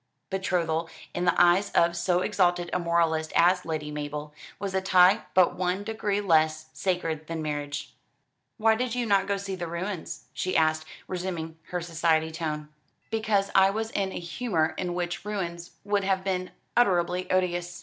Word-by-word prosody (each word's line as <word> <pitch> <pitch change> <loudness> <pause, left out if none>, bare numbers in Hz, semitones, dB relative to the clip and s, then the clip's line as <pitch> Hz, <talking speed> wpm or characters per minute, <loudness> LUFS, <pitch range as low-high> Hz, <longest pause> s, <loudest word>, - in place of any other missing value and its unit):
Betrothal, 170 -4 0 0.2
in 175 - -1
the 180 - +3
eyes 175 +3 +5
of 170 0 +3
so 180 +1 +1
exalted 175 -3 +1
a 180 - +2
moralist 165 -2 +1
as 180 +2 +4
Lady 155 -2 -3
Mabel, 150 0 -5 0.2
was 195 -1 -4
a 190 - +1
tie 185 +2 +5
but 185 -2 +5
one 185 +2 -1
degree 210 -2 -1
less 155 -4 +2
sacred 165 -4 -2
than 165 -1 -4
marriage. 145 -1 -4 0.6
"Why 225 -1 +4
did 245 +1 -1
you 245 -1 0
not 200 -2 +3
go 200 - +1
to - - -4
see 195 0 -5
the 175 -2 -4
ruins?" 170 -1 -5
she 185 - -1
asked, 155 0 +2 0.2
resuming 175 -3 -4
her 180 -1 -3
society 160 -1 +1
tone. 155 -2 -4 0.4
"Because 215 -3 +1
I 190 0 +6
was 220 +2 -3
in 195 -1 -1
a - - -5
humour 170 -2 -1
in 175 -1 -3
which 175 0 -3
ruins 175 -5 -4
would 205 0 +1
have 190 -1 +1
been 185 -1 -1 0.3
unutterably 180 -5 +2
odious. 175 -1 0
175 Hz, 170 wpm, -27 LUFS, 165-195 Hz, 0.6 s, I